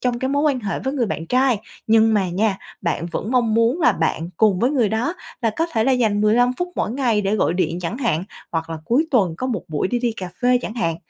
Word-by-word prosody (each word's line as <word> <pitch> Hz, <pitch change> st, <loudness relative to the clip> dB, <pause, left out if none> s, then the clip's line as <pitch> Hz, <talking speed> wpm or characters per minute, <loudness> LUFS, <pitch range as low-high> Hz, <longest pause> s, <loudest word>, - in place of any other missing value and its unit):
trong 245 Hz, -1 st, 0 dB
cái 260 Hz, -, -1 dB
mối 285 Hz, +1 st, +1 dB
quan 285 Hz, -4 st, +1 dB
hệ 205 Hz, -3 st, -3 dB
với 265 Hz, -, -3 dB
người 245 Hz, -5 st, +1 dB
bạn 165 Hz, -3 st, -4 dB
trai. 255 Hz, +1 st, +2 dB, 0.3 s
Nhưng 225 Hz, 0 st, +4 dB
mà 195 Hz, -3 st, +1 dB
nha, 195 Hz, +3 st, 0 dB, 0.2 s
bạn 170 Hz, -1 st, -2 dB
vẫn 195 Hz, +5 st, -4 dB
mong 240 Hz, -4 st, +2 dB
muốn 230 Hz, +8 st, +2 dB
là 245 Hz, -, +5 dB
bạn 165 Hz, -2 st, -1 dB
cùng 210 Hz, -3 st, +3 dB
với 245 Hz, +6 st, +2 dB
người 250 Hz, -7 st, +2 dB
đó 225 Hz, -, -1 dB, 0.3 s
là 225 Hz, -, +2 dB
có 330 Hz, -, +1 dB
thể 220 Hz, -2 st, +1 dB
là 270 Hz, -, +3 dB
dành 220 Hz, -5 st, +2 dB
15 235 Hz, +4 st, +3 dB
phút 355 Hz, -, -1 dB
mỗi -, -, -1 dB
ngày 240 Hz, -4 st, +1 dB
để 195 Hz, +1 st, 0 dB
gọi 175 Hz, -, +1 dB
điện 175 Hz, -1 st, -1 dB
chẳng 180 Hz, +7 st, -4 dB
hạn, 185 Hz, -, 0 dB, 0.3 s
hoặc 165 Hz, 0 st, -2 dB
là 165 Hz, -, -3 dB
cuối 275 Hz, -, +2 dB
tuần 195 Hz, -, +2 dB
có 255 Hz, -, -3 dB
một 225 Hz, -9 st, -2 dB
buổi 155 Hz, +3 st, -1 dB
để 245 Hz, -, 0 dB
đi 240 Hz, -1 st, 0 dB
cà 185 Hz, -, -5 dB
phê 250 Hz, 0 st, +4 dB
chẳng 220 Hz, -, -5 dB
hạn. 165 Hz, -9 st, -1 dB
225 Hz, 265 wpm, -21 LUFS, 190-250 Hz, 0.3 s, là